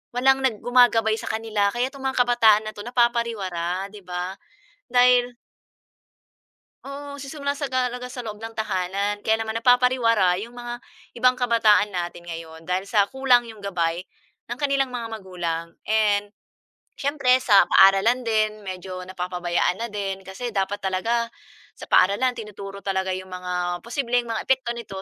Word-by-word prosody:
walang 265 +2 +4
nag 230 -6 +1
gumagabay 240 -3 +4
sa - - -8
kanila 220 -2 0
kaya 245 +2 -1
'tong 275 - -12
mga 265 0 -1
kabataan 225 -3 +4
na - - -7
'to - - -11
napapariwara, 220 -7 -1
‘di 210 - -11
ba, 180 +1 -4 0.6
dahil 245 -1 +4 1.5
Oo, 280 +1 -7
nagsisimula 280 0 -4
sa 285 -2 -4
ga 255 -1 0
talaga 250 0 -6
sa 245 -1 -7
loob 210 -1 -7
ng 225 0 -8
tahanan 200 0 -2
kaya 220 0 +2
naman 220 0 -3
napapariwara 230 -5 +3
'yong 235 +3 -9
mga 240 0 -6 0.3
ibang 250 +1 +3
kabataan 225 -4 +3
natin 175 -1 -4
ngayon 165 -1 -9
dahil 185 +3 -2
sa 205 -3 +4
kulang 255 0 +3
'yong 220 -3 -11
gabay 175 -3 -1 0.5
ng 240 - -4
kanilang 275 -2 +1
mga 240 -2 -5
magulang 175 -5 -4 0.2
and 205 -1 +1 0.6
siyempre, 275 -3 +2
sa 205 -6 +6
paaralan 195 +6 +5
din 215 -1 0
medyo 185 0 -6
napapabayaan 180 -1 -1
na 235 - -2
din. 195 -2 -4
Kasi 235 +6 -5
dapat 195 +1 0
talaga 230 +5 -1 0.5
sa - - -9
paaralan 205 +7 +4
tinuturo 200 -2 -8
talaga 190 -1 -1
'yong 185 0 -6
mga 180 0 -5 0.3
posibleng 245 -1 0
mga 225 -1 -2
epekto 260 -2 +1
nito 205 -5 -7
220 Hz, 155 wpm, -23 LUFS, 190-245 Hz, 1.5 s, sa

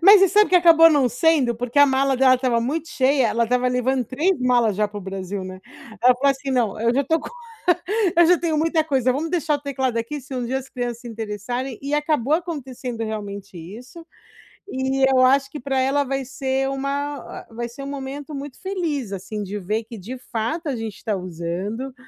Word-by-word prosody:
Mas 400 +2 +9
você 390 - +6
sabe 420 +3 +4
que 365 - +6
acabou 330 -2 +7
não 285 -5 +3
sendo? 265 -2 +2
Porque 245 +3 -2
a 285 - +8
mala 270 0 +2
dela 260 0 +5
estava 250 -2 +1
muito 300 +7 -2
cheia, 265 -3 +2
ela 235 +1 +1
estava 250 +2 +1
levando 250 +1 0
3 295 - 0
malas 240 -5 +2
já 210 0 +2
para 205 0 -8
o - - -7
Brasil, 190 0 -5
né. 185 0 -8 0.4
Ela 250 +1 +6
falou 275 +3 +2
assim: 270 0 -3
"Não, 230 -5 0
eu 230 +1 +2
já 280 +2 +2
tô 320 +4 +2
co 300 - -7 0.9
eu 345 - +7
já 355 +1 +5
tenho 325 -3 -1
muita 320 +1 +2
coisa, 260 -4 +1
vamos 300 +5 -2
deixar 330 -3 0
o 285 - -13
teclado 265 -4 -2
aqui 285 +6 -4
se 270 +1 -9
um 250 -2 -2
dia 260 +3 -1
as 265 0 -10
crianças 240 -2 -4
se 240 - -9
interessarem", 225 +3 -4
e 280 +1 -4
acabou 295 -2 +1
acontecendo 265 -8 -4
realmente 200 -3 -6
isso. 245 - -11 0.6
E 265 -4 -1
eu 255 - +4
acho 270 +1 +3
que 295 - -7
pra 265 +1 -1
ela 270 +2 +2
vai 270 0 -2
ser 270 0 -1
uma 280 +2 -2
a - - -10
vai 235 +1 -4
ser 240 +4 -10
um 275 - -6
momento 280 +2 -6
muito 275 -1 -8
feliz, 330 - -3
assim, 195 +2 -5
de 200 +1 -5
ver 210 +4 -2
que 230 - -9
de 225 +7 -7
fato 250 +7 -4
a 270 - -1
gente 225 -3 -6
tá 215 -3 -1
usando, 185 +8 -4
260 Hz, 215 wpm, -22 LUFS, 230-285 Hz, 0.9 s, Mas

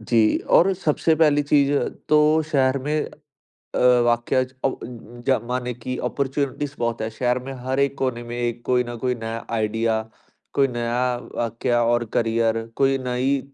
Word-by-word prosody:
जी। 110 -1 +3
और 195 +3 +5
सबसे 160 -2 +1
पहली 150 -2 +3
चीज़ 140 -1 +3 0.4
तो 150 +1 +4
शहर 135 -1 +3
में 150 0 0 0.7
अ, - - 0 0.3
वाकया 120 +2 +2
ज 130 0 -7
अ, - - +5
उ - - -5 0.5
जमाने 125 -1 0
कि 125 +2 -5
अपॉर्चुनिटीज़ 140 +2 -2
बहुत 115 -1 -1
है। 110 - -1
शहर 125 +2 0
में 135 - -6
हर 130 +1 -1
एक 140 0 +1
कोने 125 -3 -1
में 120 0 -6
एक 120 0 -2
कोई 125 -1 +2
ना 120 0 -6
कोई 125 -1 +1
नया 115 -1 -5
आइडिया, 110 +1 0 0.5
कोई 135 -1 +3
नया 120 0 -2 0.3
वाकया 120 +1 0
और 120 0 +2
करियर, 115 0 +1
कोई 135 0 +3
नई 130 +2 0
125 Hz, 165 wpm, -23 LUFS, 120-140 Hz, 0.7 s, और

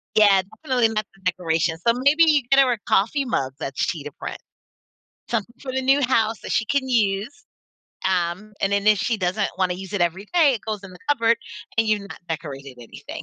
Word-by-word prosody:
Yeah, 205 -3 +6 0.2
definitely 250 -6 +2
not 215 -1 -2
the 195 - -23
decoration. 165 -3 0
So, 235 - +6
maybe 285 +6 +4
you 300 -4 +4
get 275 - +5
her 265 -2 +5
a 240 - 0
coffee 250 +8 +2
mug 135 - -1
that's 135 -1 -2
cheetah 150 -3 -4
print. - - -7 0.9
Something 235 +1 -2
for 265 - -5
the 265 0 -1
new 270 +2 +3
house 230 -4 +1
that - - -6
she 220 - +1
can 275 +2 0
use. 220 +4 0 0.6
Um, 185 +3 -1
and 195 - +1
then 200 0 0
if 210 -1 +5
she 230 +4 0
doesn't 195 +1 0
wanna 185 -1 +1
use 190 +1 -9
it 205 - -2
every 175 +4 0
day, 310 -6 +5
it 225 - -5
goes 215 -2 -3
in 190 -2 -11
the 180 - -13
cupboard 230 -5 +3 0.4
and 225 - +4
you've 215 -1 +2
not - - -9
decorated 140 -5 -6
anything. 115 - -9
215 Hz, 210 wpm, -23 LUFS, 180-250 Hz, 0.9 s, Yeah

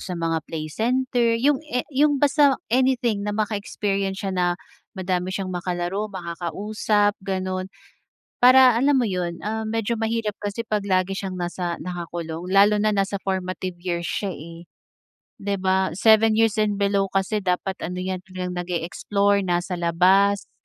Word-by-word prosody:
sa 180 - -5
mga 165 -1 -1
play 160 -2 -4
center, 240 - +1
'yong 270 +3 +2
a 250 0 -1
'yong 290 +2 +3
basta 285 -1 +4 0.2
anything 250 -4 +2
na 205 0 -3
maka-experience 200 -2 -2
siya 195 - -1
na, 180 -1 +1 0.5
madami 185 -1 -1
siyang 190 0 -3
makalaro, 180 +3 -2
makakausap, 205 +3 -1
gano'n. 185 -1 -3 0.7
Para, 255 -1 +7
alam 280 +2 +4
mo 255 - +3
'yon, 180 -4 -3
ah, 220 +1 -2
medyo 225 0 -1
mahirap 225 -1 -1
kasi 205 +3 -4
pag 210 -2 -2
lagi 185 0 +1
siyang 190 -1 -4
nasa 175 -1 -3
nakakulong 170 -1 -5
lalo 200 +2 +5
na 215 0 +1
nasa 195 0 0
formative 185 -1 -3
years 175 -1 -3
siya, 200 -2 -2
eh. 165 +2 -10 0.7
'Di 200 0 -2
ba, 190 -2 +1
7 220 +2 +5
years 225 -1 +2
and 205 -1 +1
below 200 0 +2
kasi 195 +2 -1
dapat 190 0 -2
ano 180 +1 -4
'yan, 185 0 -2
talagang 180 -1 -5
nag-e-explore, 185 +4 0
nasa 175 +1 -1
labas, 190 +4 +3
195 Hz, 150 wpm, -23 LUFS, 180-215 Hz, 0.7 s, Para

